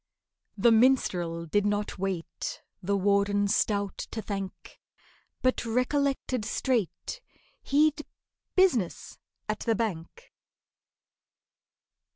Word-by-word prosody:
The 230 +4 +5
minstrel 180 -9 +3
did 205 +6 +1
not 205 -1 -1
wait 185 -3 -4 0.2
The 200 +2 0
Warden 200 +1 +2
stout 200 -1 0
to 220 - -5
thank, 195 -3 -6 0.6
But 255 0 +2
recollected 255 +1 0
straight 245 - -1 0.4
He'd 300 +1 +2 0.5
business 295 - +1 0.3
at 215 0 -2
the 225 - +1
Bank. 215 - -4
210 Hz, 90 wpm, -28 LUFS, 195-255 Hz, 0.6 s, The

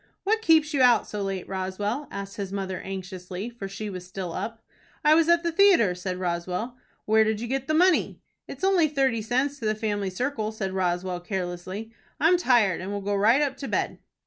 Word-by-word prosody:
"What 440 +2 +1
keeps 320 -5 +4
you 280 - +2
out 245 -3 +5
so 210 - -4
late, 195 -2 -3
Roswell?" 195 +8 -3
asked 200 0 -7
his 195 -2 -4
mother, 190 -2 -3
anxiously, 190 +2 -6
for 230 -5 -7
she 200 +2 -6
was 185 -3 -6
still 180 -1 -6
up. 225 0 -5 0.4
"I 300 - +7
was 330 +1 +4
at 340 0 +4
the 340 - 0
theatre," 340 - +5
said 180 0 -4
Roswell. 180 +6 -3 0.3
"Where 220 +1 +5
did 220 -1 0
you 235 - -4
get 270 +2 -2
the 310 - +1
money?" 360 +2 +3 0.3
"It's - - -9
only 380 -4 +4
thirty 270 -6 +1
cents 260 +6 -1
to 225 - -5
the 215 - +1
family 205 -2 -2
circle," 220 +2 -2
said 195 -3 -4
Roswell, 180 -1 -1
carelessly. 185 +3 -5 0.3
"I'm 330 +4 +5
tired, 225 - +3
and 190 +2 -5
will 205 0 -3
go 205 +1 -2
right 225 +8 +4
up 275 -2 -2
to 275 - -6
bed." - - -1
215 Hz, 205 wpm, -26 LUFS, 190-270 Hz, 0.4 s, I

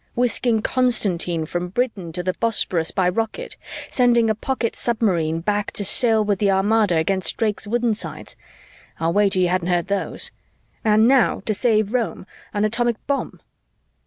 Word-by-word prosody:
Whisking 235 -2 +1
Constantine 180 -10 +1
from 175 +2 -3
Britain 195 -4 -2
to 180 +1 -3
the 185 +1 -1
Bosporus 185 -7 0
by 185 -2 0
rocket, 225 - -3 0.4
sending 240 -3 +3
a - - +2
pocket 235 +1 -2
submarine 175 -9 0
back 205 +3 -1
to 205 - -3
sail 220 +1 +3
with 205 -2 0
the 205 - +2
Armada 200 -1 +2
against 185 +3 0
Drake's 210 -2 -1
woodensides 230 -1 -2 0.6
I'll 165 +1 0
wager 200 -2 +2
you 180 -1 +3
hadn't 180 -1 0
heard 175 0 0
those! 200 0 -1 0.5
And 220 +1 +4
now, 260 -2 +3
to 215 - +1
save 215 -1 +1
Rome, 235 -6 -2 0.3
an 205 0 0
atomic 235 +2 +1
bomb. 280 -1 -3
210 Hz, 155 wpm, -21 LUFS, 185-230 Hz, 0.6 s, And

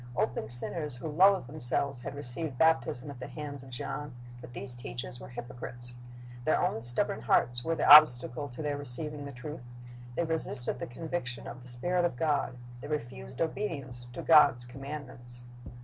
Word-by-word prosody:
Open 110 -2 -1
sinners 140 +4 +3
who 125 - -5
loathed 185 +3 +5
themselves 140 -1 0
had 130 - -6
received 140 +1 -5
baptism 145 -4 +2
at 130 - -10
the 125 - -6
hands 145 -3 -7
of 130 - -12
John; 135 +2 -5 0.3
but 125 0 -11
these 125 +1 -6
teachers - - -6
were - - -10
hypocrites. 120 - -7 0.5
Their 155 - +3
own 180 -11 0
stubborn 120 -2 -1
hearts 120 +1 +3
were 165 0 0
the - - 0
obstacle 145 -2 +8
to 125 +5 -7
their 145 -1 -1
receiving 145 +2 -3
the 140 - -6
truth. 140 +3 -7 0.5
They 170 - +1
resisted 160 -7 -2
the - - -4
conviction 125 -1 -4
of 125 - -8
the 125 - -13
Spirit 175 +9 0
of 175 - +1
God. 145 -2 0 0.2
They 145 - -7
refused 120 - -5
obedience 140 -9 -3
to - - -6
God's 145 -6 +6
commandments. 125 -2 -6
130 Hz, 170 wpm, -30 LUFS, 120-150 Hz, 0.5 s, obstacle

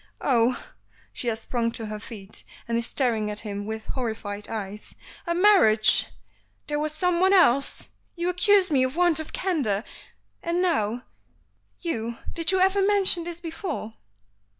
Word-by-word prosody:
"Oh!" 245 -2 +2 0.5
she 245 - -6
has 225 -1 -1
sprung 230 -1 -2
to 225 - -2
her 215 0 -6
feet, 210 -2 -9 0.2
and 230 - -1
is 235 0 0
staring 225 -6 -1
at 210 0 -3
him 205 -1 -6
with 220 0 -5
horrified 220 -5 -4
eyes. 210 -2 -7 0.3
"A 340 - 0
marriage! 350 - +5 0.6
There 295 0 -2
was 305 0 -1
someone 360 +4 +2
else! 275 -8 +3 0.3
You 345 0 -2
accuse 370 +1 +3
me 275 -3 +3
of 260 +2 0
want 345 -2 +3
of 315 - -7
candor, 270 - -1 0.6
and 340 +1 -1
now, 245 - 0 0.8
you 235 -8 -3 0.2
did 335 +1 +3
you 380 - +2
ever 385 +2 +3
mention 390 -4 +3
this 340 -1 -6
before?" 330 - -5
265 Hz, 150 wpm, -25 LUFS, 220-350 Hz, 0.8 s, marriage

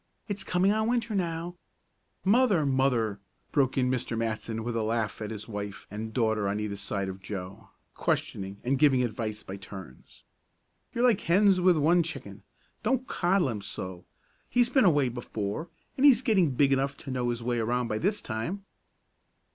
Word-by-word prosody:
It's 205 -2 -3
coming 185 +1 +2
on 220 +1 +1
Winter 235 -2 0
now 175 -2 -2 0.3
" - - -44
"Mother! 215 - +3
Mother!" 125 -6 +1 0.3
broke 135 -3 +2
in 125 -1 +2
Mr. 125 -2 -2
Matson, 115 0 -2
with 120 0 -3
a 115 - +1
laugh 110 0 -1
at 105 - -3
his 105 -1 -5
wife 105 -2 -6
and 110 +2 -5
daughter 110 -3 +1
on 105 +1 -1
either 105 -1 -3
side 100 0 -3
of 95 0 -6
Joe, 95 0 -7 0.2
questioning 95 0 -2
and 130 +2 +1
giving 135 -4 +5
advice 110 -2 -3
by 95 - -7
turns. 95 -8 -11 0.7
"You're 235 - -1
like 240 -6 +4
hens 190 +2 +4
with 180 -2 +5
one 165 +4 +4
chicken. 165 +1 -6 0.4
Don't 260 -1 0
coddle 175 - +1
him 105 -4 -4
so. 95 -2 -6 0.5
He's 245 -1 +3
been 260 -2 +4
away 145 -7 +4
before, 120 - -4 0.3
and 265 - -1
he's 265 -3 +7
getting 195 - +3
big 140 +1 +4
enough 140 +1 0
to 135 - -7
know 125 -1 -1
his 120 -1 -2
way 120 0 0
around 120 +2 0
by 110 -1 -2
this 200 +4 0
time." 120 - -4
125 Hz, 180 wpm, -28 LUFS, 110-180 Hz, 0.7 s, he's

